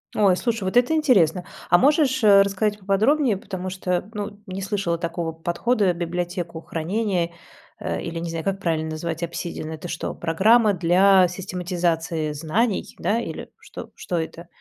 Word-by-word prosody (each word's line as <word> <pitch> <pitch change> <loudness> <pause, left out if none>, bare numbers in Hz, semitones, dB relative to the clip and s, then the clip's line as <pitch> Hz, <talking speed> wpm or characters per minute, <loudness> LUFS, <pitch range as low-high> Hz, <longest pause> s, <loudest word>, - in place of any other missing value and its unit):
Ой, 195 -4 +4
слушай, 230 -2 -1
вот 190 +5 0
это 245 +6 +4
интересно. 195 - +3 0.3
А 175 - +7
можешь, 280 - +3
э, 200 -2 +8
рассказать 205 +1 0
поподробнее, 220 +6 +2
потому 185 -1 -6
что, 185 0 -2
ну, 205 -1 -5
не 190 +1 -5
слышала 195 -3 -1
такого 170 -1 -3
подхода: 180 +5 0
библиотеку 175 -1 -4
хранения, 175 +1 -1 0.5
а, - - -3
или, 170 0 -5
не 170 0 -4
знаю, 165 -1 -4
как 195 0 -1
правильно 160 -3 -1
назвать, 160 +1 -4
"Обсидиан"- 170 -1 -4
это 160 +2 -7
что, 165 - -4
программа 210 +6 +3
для 185 +2 +5
систематизации 175 -3 -2
знаний, 180 +9 -1
да, 220 +3 +1
или 235 - -6
что - - -10
что 175 - -3
это? 165 +1 -5
180 Hz, 155 wpm, -23 LUFS, 170-205 Hz, 0.5 s, э